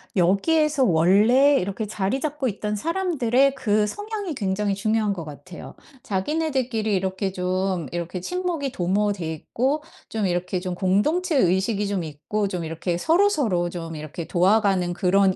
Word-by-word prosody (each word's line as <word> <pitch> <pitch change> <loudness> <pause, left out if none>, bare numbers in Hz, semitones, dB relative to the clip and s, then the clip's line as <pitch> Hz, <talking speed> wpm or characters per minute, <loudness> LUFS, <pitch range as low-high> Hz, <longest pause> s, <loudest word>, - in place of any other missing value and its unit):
여기에서 280 - +3
원래 210 - +5
이렇게 200 +4 -3
자리 205 +4 -2
잡고 295 -2 -2
있던 210 -1 -3
사람들의 275 - +1
그 215 -6 +1
성향이 415 - -4
굉장히 200 -3 -1
중요한 215 +1 0
것 175 -4 -6
같아요. 155 +3 -10 0.3
자기네들끼리 240 -1 -1
이렇게 190 +1 -1
좀 185 -1 -1
이렇게 175 +1 -4
친목이 345 - -2
도모돼 190 -3 0
있고 265 - -1 0.3
좀 220 -2 -1
이렇게 180 0 -1
좀 180 0 -4
공동체 280 - +1
의식이 195 +1 +2
좀 195 -3 -1
있고 160 +7 -3
좀 180 -3 -4
이렇게 165 +2 -3
서로서로 290 - +2
좀 165 -2 -6
이렇게 155 +2 -6
도와가는 190 0 +2
그런 190 +1 +3
200 Hz, 335 characters per minute, -24 LUFS, 180-265 Hz, 0.3 s, 원래